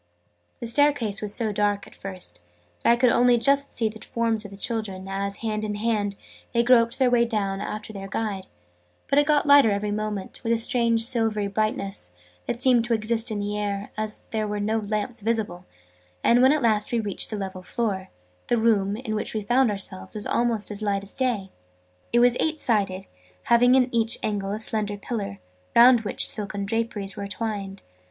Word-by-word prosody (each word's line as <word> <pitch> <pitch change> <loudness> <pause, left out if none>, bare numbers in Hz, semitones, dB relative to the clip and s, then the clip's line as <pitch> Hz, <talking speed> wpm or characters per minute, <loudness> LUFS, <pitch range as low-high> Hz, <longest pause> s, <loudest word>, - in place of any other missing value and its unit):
The - - -5
staircase 235 -5 +1
was 210 -1 -2
so 225 -3 +1
dark, 205 0 0
at - - -16
first, 185 - -7 0.4
that - - +3
I 235 - +6
could 245 0 +3
only 245 0 +4
just 280 +3 +1
see 225 - +3
the 220 0 -7
forms 230 -2 -1
of 205 - -9
the 195 - -11
children, 200 -3 -3
as, 200 +1 -3
hand 215 -1 -2
in 210 -1 -3
hand, 205 -2 -1 0.4
they 235 - +4
groped 235 -1 +4
their 260 -2 +3
way 240 -1 +4
down 200 -4 -2
after 215 +1 -6
their 195 -1 -7
guide: 195 -2 -3 0.6
but 280 +1 +3
it 290 - +2
got 300 -1 +3
lighter 285 -5 +7
every 205 0 -1
moment, 210 -2 -4
with 230 - -1
a - - +2
strange 230 -1 +3
silvery 225 -4 +3
brightness, 195 - -2 0.3
that 235 - -2
seemed 250 -2 +4
to 235 -1 +1
exist 225 +2 -1
in 210 -2 -3
the 205 +1 -3
air, 205 -1 -3
as 215 0 -3
there 215 -1 -1
were 210 0 -3
no 215 +2 0
lamps 215 +3 -3
visible; 210 -5 -2 0.6
and, 240 +1 +4
when 260 +1 +6
at 300 -3 +1
last 215 -2 +1
we 235 - +1
reached 210 0 -1
a - - -2
level 190 -2 -5
floor, 190 -1 -3 0.4
the 240 - +2
room, 210 -3 +2
in 230 -3 -5
which 215 +1 -2
we 215 - -2
found 245 +4 +3
ourselves, 190 - -4
was 210 - -5
almost 230 -3 0
as 205 0 -4
light 200 -2 -1
as 200 - -2
day. 235 -8 -2 0.6
It 240 - +4
was 245 0 +4
eight 315 -1 0
sided, 195 -6 0 0.4
having 245 +2 +4
in 255 -2 +4
each 230 0 +2
angle 200 -2 -2
a 210 - -2
slender 215 -2 -2
pillar, 200 -2 -5 0.4
round 240 0 +7
which 210 - +2
silken 205 -1 -1
draperies 215 -2 -1
were 200 -1 -5
twined. 200 -1 -5
215 Hz, 200 wpm, -24 LUFS, 200-235 Hz, 0.6 s, lighter